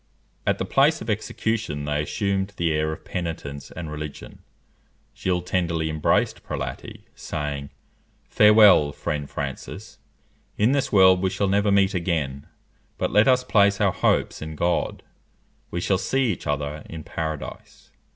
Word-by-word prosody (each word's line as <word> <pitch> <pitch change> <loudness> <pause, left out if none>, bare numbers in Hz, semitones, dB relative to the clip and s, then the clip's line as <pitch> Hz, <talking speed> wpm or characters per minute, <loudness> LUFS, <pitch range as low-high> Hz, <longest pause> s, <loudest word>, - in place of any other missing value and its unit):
At - - +2
the - - -2
place 145 +4 +3
of 110 - -3
execution 105 -7 -2
they 75 0 0
assumed 100 +4 -2
the 85 -1 +1
air 75 0 0
of 80 - -8
penitence 80 -5 -5
and 80 -3 -7
religion. 75 -1 -8 0.8
Gilles 90 -2 -1
tenderly 85 -3 -1
embraced 75 -1 +1
Prelati, 65 -1 -6
saying, 70 -1 -5 0.6
"_Farewell, 105 -9 +6
friend 75 -2 -3
Francis! 70 -2 -6 0.6
In 110 +4 +3
this 140 -1 0
world 95 -2 +6
we 95 - +1
shall 95 +2 -1
never 100 +1 +2
meet 100 -1 +3
again; 80 -7 -2 0.5
but - - -1
let 105 +1 +4
us 125 -1 +4
place 100 -5 +3
our 100 -2 +3
hopes - - +1
in 80 0 -6
God; 85 +3 -1 0.7
we 85 - -3
shall 95 +1 +1
see 130 +4 +1
each - - -9
other 75 +1 -2
in 80 -1 -7
Paradise_." 80 -1 -6
85 Hz, 145 wpm, -24 LUFS, 75-100 Hz, 0.8 s, Farewell